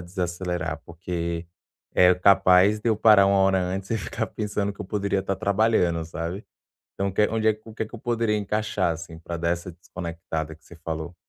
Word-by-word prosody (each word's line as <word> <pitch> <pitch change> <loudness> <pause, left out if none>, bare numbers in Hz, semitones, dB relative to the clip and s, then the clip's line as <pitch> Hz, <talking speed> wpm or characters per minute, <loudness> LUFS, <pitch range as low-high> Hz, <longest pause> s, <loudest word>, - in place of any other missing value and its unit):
desacelerar? 85 -2 -3
Porque 85 0 -4 0.5
é 90 0 +6
capaz 95 +2 +5
de 115 - -1
eu 110 - +2
parar 105 -3 +6
1 100 0 +3
hora 95 -1 +3
antes 95 +2 -3
e 115 - +1
ficar - - -3
pensando 105 -1 -2
que - - -15
eu - - -3
poderia 100 -1 -1
estar 95 0 -2
trabalhando, 100 -5 +2
sabe? 85 +4 -5 0.5
Então 100 0 -1
o - - -8
que 105 +2 +3
onde 110 -1 0
é - - +7
o 110 - -11
que 110 - -3
que - - -17
eu 120 - -7
poderia 115 -2 0
encaixar, 105 -3 0
assim, 80 0 -8
para 85 0 -5
dar 85 0 -1
essa 85 +1 -2
desconectada 85 -2 -6
que - - -27
você 85 - -13
falou? 80 +1 -4
95 Hz, 200 wpm, -25 LUFS, 85-105 Hz, 0.5 s, é